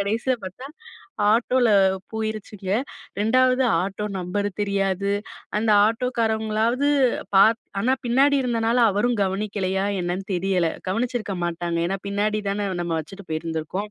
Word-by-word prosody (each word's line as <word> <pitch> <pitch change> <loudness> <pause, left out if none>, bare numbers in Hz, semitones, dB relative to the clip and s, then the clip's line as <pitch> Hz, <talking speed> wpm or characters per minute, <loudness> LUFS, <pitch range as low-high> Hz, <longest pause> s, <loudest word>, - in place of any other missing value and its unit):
கடைசில 225 +6 0
பாத்தா 190 +8 -8 0.7
ஆட்டோல 245 +2 +2 0.4
போயிருச்சுங்க 215 -3 -4 0.5
2வது 255 +4 +3 0.2
ஆட்டோ 200 +2 -3
நம்பர் 195 +3 -2
தெரியாது. 200 -1 0 0.5
அந்த 220 +1 +1 0.2
ஆட்டோக்காரவங்களாவது 225 +2 0 0.5
பாத் 220 +4 +6 0.2
ஆனா 255 +2 +3
பின்னாடி 275 +4 +4
இருந்தனால 230 0 +1
அவரும் 230 +4 +1
கவனிக்கலையா? 195 0 -1 0.2
என்னன்னு 180 +2 -3
தெரியல. 180 -1 +1 0.2
கவனிச்சிருக்க 225 -1 -2
மாட்டாங்க. 170 0 -2
ஏன்னா 195 +1 -2
பின்னாடிதான 205 0 -1
நம்ம 170 -1 -2
வச்சுட்டு 195 +5 -12
போயிருந்துருக்கோம். 165 +5 -3
205 Hz, 110 wpm, -23 LUFS, 190-230 Hz, 0.7 s, பாத்